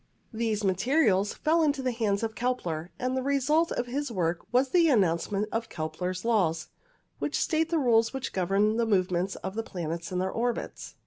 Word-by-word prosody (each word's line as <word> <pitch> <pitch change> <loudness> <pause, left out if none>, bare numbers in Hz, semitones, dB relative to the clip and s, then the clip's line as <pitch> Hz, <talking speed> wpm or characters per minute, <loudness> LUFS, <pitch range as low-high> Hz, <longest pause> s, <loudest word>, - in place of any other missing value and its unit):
These 220 -2 -1
materials 205 - +2
fell 325 +2 +2
into 290 -3 +1
the 255 - +1
hands 220 -3 0
of 225 -1 -2
Kepler, 180 -10 -2
and 255 +1 -1
the 260 - 0
result 280 +5 +2
of 245 - -1
his 275 +2 -3
work 175 -4 0
was 255 +2 +3
the 340 0 +4
announcement 200 - +1
of 225 0 -2
Kepler's 180 +5 -4
Laws, 180 -9 +1 0.5
which - - -1
state 320 -1 +1
the 335 - +1
rules 230 -5 +3
which 265 -1 -5
govern 195 +4 +1
the 235 -1 +1
movements 185 -2 +1
of 190 - -6
the 225 - -2
planets 170 -5 -5
in 180 - -2
their 185 +1 0
orbits. 240 +1 -3
225 Hz, 185 wpm, -28 LUFS, 185-255 Hz, 0.5 s, the